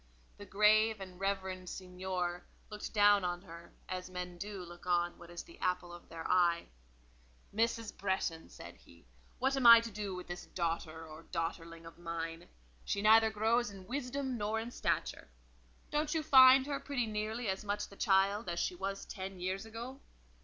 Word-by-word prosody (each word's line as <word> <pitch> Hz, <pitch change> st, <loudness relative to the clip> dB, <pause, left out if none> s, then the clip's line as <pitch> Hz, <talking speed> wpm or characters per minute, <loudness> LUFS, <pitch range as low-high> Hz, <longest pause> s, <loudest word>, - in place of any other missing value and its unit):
The 205 Hz, -, -9 dB
grave 215 Hz, +1 st, +4 dB
and 185 Hz, -2 st, -9 dB
reverend 190 Hz, -2 st, -2 dB
seignor 180 Hz, -1 st, -4 dB, 0.3 s
looked 210 Hz, 0 st, -6 dB
down 205 Hz, -2 st, +5 dB
on 175 Hz, 0 st, -2 dB
her 170 Hz, -2 st, -12 dB, 0.2 s
as 185 Hz, 0 st, -5 dB
men 180 Hz, -1 st, -6 dB
do 200 Hz, -1 st, -5 dB
look 175 Hz, +1 st, -12 dB
on 175 Hz, -1 st, +1 dB
what 170 Hz, -, -12 dB
is 175 Hz, 0 st, -7 dB
the 340 Hz, -, -16 dB
apple 180 Hz, -1 st, -1 dB
of 175 Hz, -, -13 dB
their 165 Hz, 0 st, -6 dB
eye. 175 Hz, -2 st, +2 dB, 0.8 s
"Mrs. 230 Hz, 0 st, 0 dB
Bretton," 190 Hz, -4 st, -2 dB
said -, -, -11 dB
he: 75 Hz, +5 st, -20 dB, 0.3 s
"what 265 Hz, +2 st, +1 dB
am 265 Hz, -3 st, +4 dB
I 230 Hz, 0 st, +12 dB
to 230 Hz, 0 st, -6 dB
do 200 Hz, -2 st, -4 dB
with 180 Hz, -, -7 dB
this 175 Hz, 0 st, -7 dB
daughter 165 Hz, -2 st, -3 dB
or 160 Hz, +1 st, -12 dB
daughterling 165 Hz, 0 st, -4 dB
of 165 Hz, +1 st, -12 dB
mine? 165 Hz, 0 st, -5 dB, 0.4 s
She 200 Hz, -, -2 dB
neither 220 Hz, +1 st, +7 dB
grows 225 Hz, +2 st, +1 dB
in 195 Hz, -2 st, -11 dB
wisdom 260 Hz, +1 st, -3 dB
nor 215 Hz, +2 st, -1 dB
in 230 Hz, +2 st, -5 dB
stature. -, -, -2 dB, 0.6 s
Don't 300 Hz, +1 st, 0 dB
you 315 Hz, -, 0 dB
find 260 Hz, -1 st, +8 dB
her 280 Hz, -1 st, -2 dB
pretty 265 Hz, -5 st, -2 dB
nearly 215 Hz, +2 st, -3 dB
as 190 Hz, +1 st, -2 dB
much 205 Hz, 0 st, -2 dB
the 200 Hz, -, -14 dB
child 195 Hz, +1 st, +2 dB
as 170 Hz, 0 st, -2 dB
she -, -, 0 dB
was 195 Hz, +2 st, -4 dB
ten 190 Hz, -1 st, -7 dB
years 190 Hz, +4 st, -3 dB
ago?" 235 Hz, +4 st, -7 dB
195 Hz, 180 wpm, -33 LUFS, 175-220 Hz, 0.8 s, I